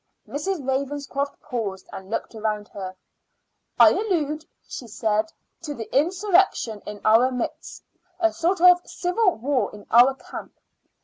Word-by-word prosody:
Miss 290 +5 -5
Ravenscroft 280 -3 -2
paused 220 -9 -4
and 190 0 -9
looked 225 - -3
round 215 -1 -3
her. 190 -2 -7 0.8
"I - - +9
allude," 315 -8 -1 0.2
she 245 - -7
said, 215 0 0 0.3
"to 300 -4 -5
the 225 -1 -7
insurrection 350 - +2
in 210 0 -6
our 225 +4 +5
midst 250 -2 -5 0.4
a 335 -2 +2
sort 345 +1 0
of 360 0 +7
civil 370 +2 0
war 260 +3 0
in 210 -1 -12
our 250 +3 +6
camp. - - -9
270 Hz, 135 wpm, -24 LUFS, 220-335 Hz, 0.8 s, I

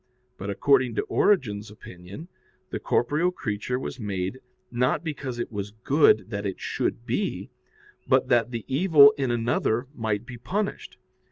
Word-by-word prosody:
But 100 - -6
according 130 +3 +2
to - - 0
Origen's 110 - +1
opinion, 100 - -11 0.4
the - - -3
corporeal 150 +8 +1
creature 115 - -3
was 130 - -6
made, 100 +2 -3 0.3
not 125 +5 +1
because 145 -6 -5
it 120 - -4
was 105 -1 -4
good 135 - +4
that 100 -1 -3
it 95 -2 -4
should 115 - -2
be, 160 - -2 0.6
but 130 -1 +3
that 120 -2 +3
the 115 -3 -5
evil 145 0 +7
in 135 -3 -1
another 120 0 0
might 110 -3 -2
be 120 -2 -9
punished. 200 - -3
120 Hz, 150 wpm, -26 LUFS, 105-140 Hz, 0.6 s, evil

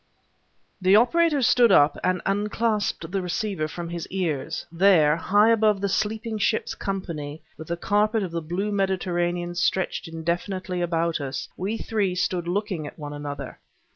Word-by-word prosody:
The 185 +2 +5
operator 290 +5 +4
stood 240 -1 +5
up 145 -4 +5
and 185 -1 0
unclasped 210 0 -1
the 195 0 -1
receivers 180 -2 -2
from 170 +2 -6
his 170 -1 -5
ears. 165 -4 -2
There, 170 -4 +5
high 205 +6 +3
above 215 -3 +3
the 200 0 -1
sleeping 220 +2 -1
ship's 215 +2 0
company, 165 -6 -5
with 160 - -10
the 170 - -2
carpet 210 +3 +1
of 180 - -4
the 170 0 -3
blue 180 +6 -2
Mediterranean 175 -3 -1
stretched 180 0 0
indefinitely 175 +3 -3
about 170 -2 0
us, 135 -1 -4
we 200 +5 -2
three 205 -5 -1
stood 180 -1 -1
looking 185 -4 -2
at - - -11
one 145 -2 -7
another. 145 -2 -6
185 Hz, 155 wpm, -25 LUFS, 165-205 Hz, -, The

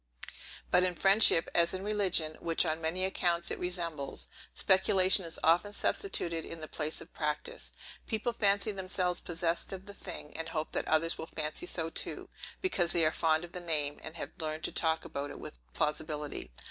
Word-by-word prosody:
But 180 - +5
in 180 -1 +1
friendship, 195 -3 +6
as 170 +2 +4
in 185 - -5
religion, 190 -7 +2
which 165 +1 +2
on 160 0 -1
many 170 +4 0
accounts 175 -2 0
it - - -3
resembles, 165 - -3 0.3
speculation 190 0 +4
is 165 - -2
often 175 +6 +3
substituted 170 - 0
in 165 - -6
the 155 - -6
place 155 0 -2
of - - -13
practice. 150 -1 -3 0.4
People 225 +1 -1
fancy 200 0 +2
themselves 185 -2 -1
possessed 170 0 -1
of 190 0 -7
the 200 - -9
thing, 175 -6 -8
and 160 0 -4
hope 155 -1 -3
that - - -2
others 165 +1 +2
will 160 - -5
fancy 155 +2 -3
so 165 -2 -2
too, - - -3 0.3
because 180 - +2
they 170 -2 +3
are 155 - +3
fond 160 +1 +1
of 170 - -15
the 180 - -6
name, 150 -4 +1
and 160 - -7
have - - -6
learned 155 -1 -3
to - - 0
talk 160 -1 +1
about 140 +1 -5
it - - -9
with 60 - -8
plausibility. 150 - -2
170 Hz, 185 wpm, -31 LUFS, 155-185 Hz, 0.4 s, friendship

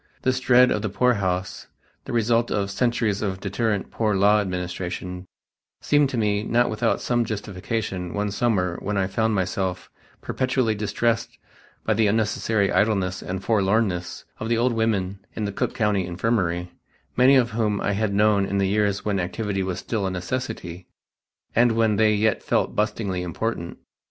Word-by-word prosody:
This 130 0 +1
dread 125 0 +5
of 105 - 0
the 105 - -2
poorhouse, 95 -4 0 0.4
the - - -6
result 115 0 +2
of 100 -1 -1
centuries 115 -2 0
of 95 -3 -2
deterrent 100 +1 -2
Poor 110 -3 0
Law 100 +2 +4
administration, 90 -1 -4 0.5
seemed 145 -2 +3
to 130 - -3
me 105 -2 +1
not 120 +2 +1
without 110 +2 0
some 120 -1 +1
justification 100 -3 -4
one 105 0 -1
summer 95 -5 0
when 100 +1 -2
I 95 - +2
found 110 +3 0
myself 95 -1 -2 0.3
perpetually 130 -3 0
distressed 110 +3 -1 0.5
by 110 - +2
the 110 0 +2
unnecessary 105 -1 +1
idleness 95 -4 +1
and 95 +1 -5
forlornness 100 -4 0
of 110 - -4
the 115 - +2
old 120 +1 +2
women 100 -4 0 0.2
in 110 - -2
the 100 - -2
Cook - - -2
County 105 -5 +1
Infirmary, 90 -2 -1 0.4
many 130 +2 +6
of 125 -3 +3
whom 105 -2 0
I - - 0
had 105 +1 0
known 100 -1 +3
in 100 - -1
the 100 -1 +2
years 100 0 0
when 100 -2 0
activity 95 +2 -2
was 95 -1 -2
still 100 0 -2
a - - -1
necessity, 95 -2 -5 0.7
and 120 0 +4
when 110 -2 +2
they 110 0 +4
yet 110 0 +1
felt - - 0
bustlingly 105 -3 -1
important. 90 0 -3
105 Hz, 165 wpm, -24 LUFS, 95-115 Hz, 0.7 s, many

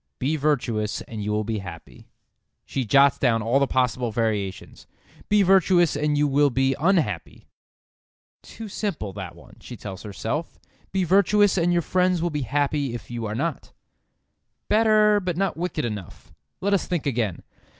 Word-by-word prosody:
Be 145 +5 0
virtuous 120 -8 -1
and 110 -2 -7
you 105 - -2
will 105 0 0
be 110 0 -3
happy. 95 -2 -11 0.6
She 130 - -3
jots 140 +4 +4
down 115 -4 +2
all 120 +5 +2
the 140 - +2
possible 125 -2 0
variations: 105 -4 -3 0.4
Be 205 -1 +4
virtuous 180 -3 +4
and 150 0 0
you 150 0 +3
will 145 +1 +3
be 135 +1 +1
unhappy. 175 +1 0 0.9
"Too 225 - -9
simple 175 - -4
that 95 -3 -7
one," - - -17
she 120 - -10
tells 100 -2 -8
herself. 115 +9 -4 0.3
Be 190 0 0
virtuous 200 +3 +4
and 175 -1 +2
your 175 -1 +1
friends 185 0 +1
will 170 +1 -1
be 150 -1 -2
happy 140 0 -1
if 120 - -9
you 115 -2 -4
are 105 - -4
not. 155 +4 -3 1.0
"Better, 215 -1 +4
but 180 -4 -3
not 195 +1 0
wicked 175 -5 -3
enough. 100 -6 -7 0.3
Let 200 +2 +1
us 195 - +1
think 175 -5 -2
again. 115 -9 -1
140 Hz, 165 wpm, -24 LUFS, 115-180 Hz, 1.0 s, jots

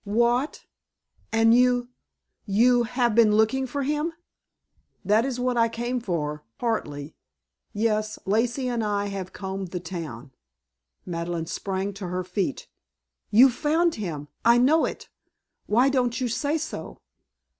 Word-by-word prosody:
"What? 240 +6 +1 0.7
And 225 0 +4
you 245 0 +3 0.6
you 240 +4 +4
have 245 -2 +1
been 215 -2 +5
looking 260 +5 +2
for 280 +3 -3
him?" 300 +4 -1 0.9
"That 215 +5 +3
is 260 -2 -3
what 250 -1 0
I 230 0 +4
came 240 +2 -2
for 150 -8 -3
partly. 150 -11 -3 0.6
Yes, 215 0 0
Lacey 235 +6 0
and 240 -2 -1
I 205 -1 -1
have 190 -2 -5
combed 190 -1 -5
the 180 +1 -5
town." 155 -8 -7 0.7
Madeleine 170 -1 -3
sprang 190 +3 -3
to 195 -1 -6
her 180 +1 -2
feet. 190 +9 -3 0.6
"You've 245 +4 +6
found 320 +5 +1
him! 150 -7 -4 0.2
I 235 +1 +6
know 285 +7 +4
it! - - -6 0.6
Why 240 +5 +4
don't 250 -3 +1
you 255 - 0
say 285 +6 0
so?" 315 0 -6
225 Hz, 135 wpm, -25 LUFS, 190-250 Hz, 0.9 s, You've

